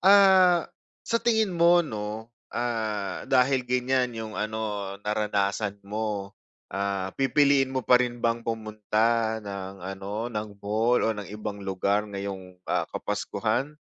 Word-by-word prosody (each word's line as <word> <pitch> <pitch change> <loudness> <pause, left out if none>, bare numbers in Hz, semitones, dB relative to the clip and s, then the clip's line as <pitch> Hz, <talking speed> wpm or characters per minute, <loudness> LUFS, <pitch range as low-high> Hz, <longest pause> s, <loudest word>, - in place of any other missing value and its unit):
ah, 190 -3 +6 0.4
sa 230 0 +1
tingin 220 -5 +2
mo 170 0 +5
'no, 110 -1 -5 0.2
ah, 110 -4 -2
dahil 130 0 +4
ganiyan 125 -1 +1
yung 110 -1 -5
ano, 105 -2 -3
naranasan 105 -1 0
mo, 105 -1 -3 0.4
ah, 100 -1 -2
pipiliin 140 0 +4
mo 130 - -1
pa 125 0 +6
rin 120 -1 -1
bang 115 0 +2
pumunta 110 0 0
ng 95 -2 -6
ano, 100 +5 -4
ng 105 -1 -3
mall 110 +4 +2
o 115 - +2
ng 105 -3 -7
ibang 105 -1 -5
lugar 100 +2 0
ngayong, 95 -2 -6
ah, - - -1
kapaskuhan? 150 +3 -2
110 Hz, 130 wpm, -27 LUFS, 100-125 Hz, 0.4 s, ah